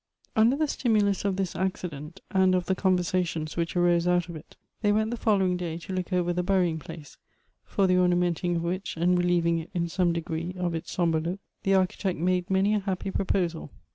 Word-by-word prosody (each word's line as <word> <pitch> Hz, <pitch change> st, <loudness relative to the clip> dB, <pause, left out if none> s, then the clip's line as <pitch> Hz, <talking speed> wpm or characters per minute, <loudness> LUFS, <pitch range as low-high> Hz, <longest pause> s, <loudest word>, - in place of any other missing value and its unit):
UNDER 225 Hz, +4 st, +4 dB
the 310 Hz, +1 st, 0 dB
stimulus 210 Hz, -8 st, +1 dB
of 195 Hz, -2 st, +1 dB
this 190 Hz, -2 st, -2 dB
accident, 170 Hz, -5 st, -4 dB
and 190 Hz, -2 st, +4 dB
of 180 Hz, -1 st, 0 dB
the 190 Hz, -, +1 dB
con 185 Hz, -1 st, +2 dB
versations 175 Hz, -3 st, -2 dB
which 170 Hz, +1 st, -2 dB
arose 175 Hz, -1 st, +3 dB
out 180 Hz, -1 st, +2 dB
of 170 Hz, -, -7 dB
it, 155 Hz, -, -12 dB, 0.3 s
they 205 Hz, -2 st, +3 dB
went 215 Hz, +2 st, +1 dB
the -, -, -1 dB
fol 220 Hz, -3 st, +2 dB
lowing 185 Hz, -2 st, +1 dB
day 170 Hz, -2 st, -4 dB
to 170 Hz, +3 st, -7 dB
look 185 Hz, 0 st, -3 dB
over 175 Hz, -1 st, +1 dB
the 180 Hz, -, 0 dB
burying 180 Hz, -3 st, +1 dB
place, 155 Hz, -2 st, -11 dB, 0.5 s
for 195 Hz, -, 0 dB
the 185 Hz, -1 st, +3 dB
orna 180 Hz, -1 st, +3 dB
menting 175 Hz, 0 st, 0 dB
of 165 Hz, -, -1 dB
which 185 Hz, +1 st, -3 dB
and 175 Hz, +2 st, +3 dB
relieving 170 Hz, -1 st, +2 dB
it 165 Hz, -, -8 dB
in 170 Hz, -1 st, 0 dB
some 175 Hz, +1 st, +1 dB
degree 170 Hz, +1 st, -3 dB
of 175 Hz, -2 st, -1 dB
its 165 Hz, -, -5 dB
sombre 165 Hz, -3 st, +1 dB
look, 175 Hz, +4 st, -3 dB, 0.2 s
the 195 Hz, 0 st, +2 dB
architect 185 Hz, 0 st, 0 dB
made 180 Hz, +2 st, 0 dB
many 195 Hz, +2 st, +2 dB
a 210 Hz, -, +2 dB
happy 195 Hz, -1 st, -3 dB
proposal. 175 Hz, -5 st, -1 dB
180 Hz, 220 wpm, -27 LUFS, 170-190 Hz, 0.5 s, UNDER